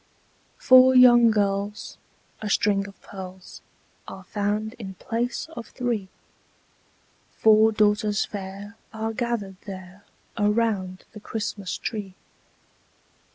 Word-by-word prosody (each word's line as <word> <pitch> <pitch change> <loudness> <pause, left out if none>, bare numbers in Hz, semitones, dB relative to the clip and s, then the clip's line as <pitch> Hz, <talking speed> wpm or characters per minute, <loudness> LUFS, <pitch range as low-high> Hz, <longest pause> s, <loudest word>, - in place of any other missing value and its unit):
Four 255 0 +6
lovely 240 -2 +7
girls, 205 -1 -2 0.4
a 215 - -4
string 200 -1 +1
of 195 - -14
pearls, 190 -1 -10 0.5
Are 190 - -9
found 210 +3 -2
in 190 -4 -7
place 235 - -3
of 235 - -7
three: 235 -6 -3 1.3
Four 220 0 +5
daughters 210 -1 +1
fair 200 +2 -8
are 220 0 -4
gathered 225 -5 -3
there 190 0 -9 0.4
Around 205 -3 0
the 215 - -11
Christmas 205 -3 -4
tree. 205 -4 -5
210 Hz, 105 wpm, -24 LUFS, 195-225 Hz, 1.3 s, lovely